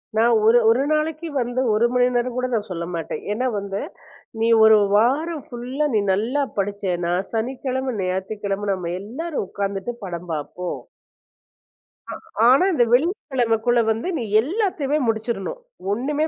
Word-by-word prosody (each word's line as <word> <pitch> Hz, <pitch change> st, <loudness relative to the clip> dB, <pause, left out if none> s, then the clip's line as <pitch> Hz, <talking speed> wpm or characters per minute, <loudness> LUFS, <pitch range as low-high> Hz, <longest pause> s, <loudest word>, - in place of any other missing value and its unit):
நான் 230 Hz, +2 st, +4 dB
ஒரு 230 Hz, +2 st, +6 dB
ஒரு 240 Hz, +4 st, +3 dB
நாளைக்கு 310 Hz, +2 st, -1 dB
வந்து 245 Hz, +1 st, -1 dB
1 220 Hz, +3 st, +3 dB
மணி 250 Hz, 0 st, +4 dB
நேரம் 245 Hz, 0 st, 0 dB
கூடச் 250 Hz, -5 st, -1 dB
சொல்லமாட்டேன். 170 Hz, -1 st, -4 dB
ஏன்னா 250 Hz, +5 st, 0 dB
வந்து 200 Hz, 0 st, -4 dB, 0.6 s
"நீ 230 Hz, -, +3 dB
ஒரு 220 Hz, 0 st, +8 dB, 0.2 s
வாரம் 285 Hz, +8 st, +1 dB
ஃபுல்லா 255 Hz, +5 st, -2 dB
நீ 210 Hz, -, +3 dB
நல்லா 245 Hz, +9 st, 0 dB, 0.2 s
படிச்சேனா, 190 Hz, -4 st, -1 dB, 0.2 s
சனிக்கிழம, 260 Hz, +2 st, -2 dB
ஞாயித்துக்கிழம 195 Hz, +2 st, -2 dB
நம்ம 175 Hz, -2 st, -4 dB
எல்லாரும் 275 Hz, +6 st, -4 dB
உக்காந்துட்டு 200 Hz, +3 st, -3 dB
படம் 175 Hz, -1 st, -6 dB
பாப்போம்." 160 Hz, +4 st, -4 dB, 1.7 s
ஆனா 270 Hz, +7 st, +6 dB
இந்த 245 Hz, -, +4 dB
வெள்ளிக்கிழமக்குள்ள 245 Hz, -, +2 dB
வந்து 225 Hz, +9 st, -2 dB
நீ 235 Hz, -, -2 dB, 0.2 s
எல்லாத்தையுமே 305 Hz, -, -1 dB
முடிச்சிறனும். 225 Hz, -, -2 dB, 0.3 s
ஒண்ணுமே 290 Hz, +7 st, -1 dB
235 Hz, 125 wpm, -22 LUFS, 200-265 Hz, 1.7 s, ஒரு